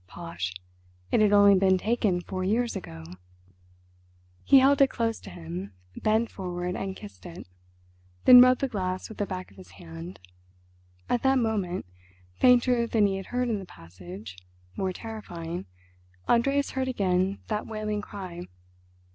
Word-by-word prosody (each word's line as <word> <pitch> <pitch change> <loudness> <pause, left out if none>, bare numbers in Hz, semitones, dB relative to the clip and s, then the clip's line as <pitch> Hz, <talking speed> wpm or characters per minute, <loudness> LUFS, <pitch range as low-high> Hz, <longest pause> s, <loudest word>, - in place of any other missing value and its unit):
Posh! 165 - -5 0.6
it - - +3
had 210 -1 +4
only 205 -1 +7
been 190 -1 +4
taken 210 -3 0
four 185 +1 -5
years 230 +5 0
ago. 80 - -8 1.4
He 275 - +6
held 275 +1 +5
it 275 - +6
close 230 -3 -2
to - - -11
him, 90 +3 -7 0.2
bent 220 +2 +1
forward 180 -1 -4
and 190 -1 -4
kissed 210 0 -12
it. 175 - -10 0.8
Then 250 -1 +11
rubbed 255 0 +5
the 275 - +1
glass 185 -5 -3
with 220 - -11
the 205 - -1
back 185 -1 -6
of 100 - -21
his 90 -1 -14
hand. 85 +2 -9 0.9
At 240 - 0
that 265 0 +3
moment, 210 -7 -1 0.5
fainter 245 - +4
than 220 -2 +3
he 195 -1 0
had 195 - -7
heard 250 0 -1
in 220 -3 -1
the - - -7
passage, 90 - -11 0.4
more 190 -1 -1
terrifying, 180 - -7 0.6
Andreas 275 +4 +2
heard 265 0 -2
again 190 -5 0
that 210 -1 -2
wailing 215 -1 -3
cry. 185 -4 -8
195 Hz, 155 wpm, -27 LUFS, 175-230 Hz, 1.4 s, Then